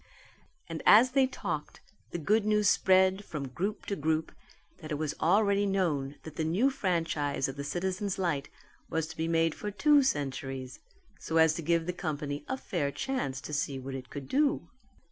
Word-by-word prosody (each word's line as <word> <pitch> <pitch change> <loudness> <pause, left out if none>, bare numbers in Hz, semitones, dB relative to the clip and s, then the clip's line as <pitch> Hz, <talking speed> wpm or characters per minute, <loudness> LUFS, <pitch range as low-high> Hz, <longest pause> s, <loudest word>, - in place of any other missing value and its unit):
And - - -5
as 235 +5 +7
they 265 0 +4
talked, 170 - -5 0.3
the - - -4
good 210 +7 +2
news 210 0 +2
spread 190 +1 +4
from 145 -7 -5
group 195 +11 -3
to 200 - -2
group 160 0 -1 0.5
that 155 -1 -9
it - - 0
was 150 -1 -2
already 200 +3 +3
known 155 -8 0
that 160 - -10
the 160 - 0
new 195 +13 +2
franchise 165 - -1
of 135 - -6
the 140 - -5
Citizens' 190 +5 -2
Light 165 -7 -1 0.4
was 160 -1 0
to 160 - -9
be 160 +1 -2
made 165 -1 +2
for 210 - -5
two 295 +7 +4
centuries 135 - -3 0.4
so 165 - -2
as 160 -1 +6
to 165 - -4
give 165 +1 +1
the 180 - -2
company 150 -4 -4
a 265 - -2
fair 170 - -2
chance 145 - -2
to 150 - -7
see 145 -1 -1
what 135 +1 -6
it 130 -1 -7
could 140 -2 -7
do. 290 +2 +1
165 Hz, 185 wpm, -30 LUFS, 145-200 Hz, 0.5 s, as